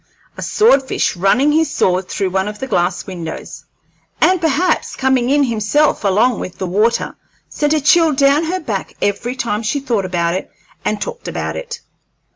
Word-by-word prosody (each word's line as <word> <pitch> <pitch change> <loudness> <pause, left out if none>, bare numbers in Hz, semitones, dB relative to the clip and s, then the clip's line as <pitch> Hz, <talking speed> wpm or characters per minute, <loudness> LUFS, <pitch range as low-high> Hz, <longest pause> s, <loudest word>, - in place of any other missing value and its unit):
A - - -8
sword 420 -11 +4
fish 260 - -1
running 220 +11 +3
his 320 +1 +2
sword 185 0 0
through 195 -3 -2
one 190 +1 0
of 210 0 -5
the 265 - -4
glass 175 -7 -1
windows, 170 -4 -7 0.5
and 370 -1 +3
perhaps 325 +3 0
coming 260 -2 +1
in 285 +1 +3
himself 235 +5 +1
along 210 +4 +2
with 180 - -7
the 190 - -3
water, 210 +6 0 0.3
sent 295 0 0
a - - +2
chill 325 +2 +4
down 280 +3 +3
her 365 +3 -2
back 215 - -4
every 235 +5 -1
time 230 -4 -2
she 235 +6 -1
thought 235 -7 -1
about 170 -2 0
it 185 - -4 0.3
and 210 - -1
talked 485 0 -6
about - - -3
it. 475 -1 -6
240 Hz, 180 wpm, -17 LUFS, 195-295 Hz, 0.5 s, sword